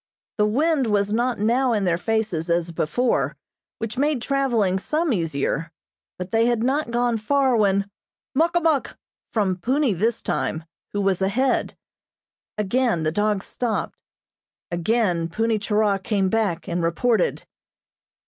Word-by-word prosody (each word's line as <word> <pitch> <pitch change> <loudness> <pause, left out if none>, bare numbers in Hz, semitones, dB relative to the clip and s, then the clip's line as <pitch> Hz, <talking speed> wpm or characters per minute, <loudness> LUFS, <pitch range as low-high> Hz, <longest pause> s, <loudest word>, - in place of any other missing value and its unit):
The 210 - +4
wind 280 +3 +1
was 205 -1 +1
not 240 +2 +1
now 240 +4 +2
in 210 -3 0
their 175 -3 +2
faces 185 -5 -1
as 170 0 +1
before, 170 +10 0 0.4
which 225 +2 -4
made 290 -1 +1
traveling 235 -8 +1
some 310 - 0
easier, 165 -2 -1 0.5
but 180 0 -6
they 225 +1 +3
had 240 -2 +1
not 275 +2 0
gone 240 0 +1
far 265 +3 +2
when: 200 -2 +2 0.5
"Muk 325 +5 +2
a 345 - +3
muk!" 315 -5 0 0.3
from 195 -5 0
Punni 260 - +1
this 220 +6 0
time, 160 - -2 0.3
who 205 - -1
was 195 -2 +1
ahead. 245 +7 0 0.8
Again 215 -3 +1
the 155 - +1
dogs 205 +1 0
stopped. 240 -3 -2 0.8
Again 175 -1 +1
Punni 225 +4 0
Churah 210 -1 +1
came 195 -1 0
back, 205 -5 -1
and 175 0 -1
reported. 230 - +1
215 Hz, 140 wpm, -23 LUFS, 190-245 Hz, 0.8 s, The